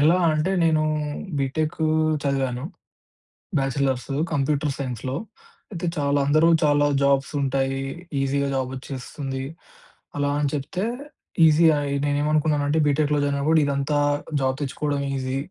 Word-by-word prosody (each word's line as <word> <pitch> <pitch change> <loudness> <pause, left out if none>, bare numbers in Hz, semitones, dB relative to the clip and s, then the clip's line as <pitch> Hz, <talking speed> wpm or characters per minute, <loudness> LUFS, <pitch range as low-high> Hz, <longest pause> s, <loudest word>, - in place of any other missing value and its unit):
ఎలా 160 +5 +5 0.2
అంటే 155 +5 0
నేను 155 -1 +3 0.6
బీటెక్కూ 155 +3 -1 0.4
చదివాను. 135 -2 -1 0.9
బ్యాచలర్స్. 135 -1 -1 0.2
కంప్యూటర్ 145 -1 0
సైన్స్‌లో. 130 -1 -4 0.6
అయితే 175 -3 -4
చాలా 145 0 +1
అందరూ 155 +3 +4 0.2
చాలా 145 -1 +4 0.2
జాబ్సుంటాయి. 135 -1 +1 0.4
ఈజీగా 140 +1 0
జాబెచ్చేస్తుంది. 130 +1 -5 0.7
అలా 145 0 +1
అని 145 -1 +1
చెప్తే 150 +7 -2 0.6
ఈజియా 160 0 +5
ఐ - - -2 0.2
నేనేమనుకున్నానంటే 150 +1 +1
బిటెక్‌లో 145 0 +2
జాయినయినప్పుడు 145 +3 +2
ఇదంతా 140 +1 0 0.4
జాబ్ 130 0 +1
తెచ్చుకోవడం 145 0 -2
ఈజీ... 130 0 -2
140 Hz, 105 wpm, -24 LUFS, 135-150 Hz, 0.9 s, ఎలా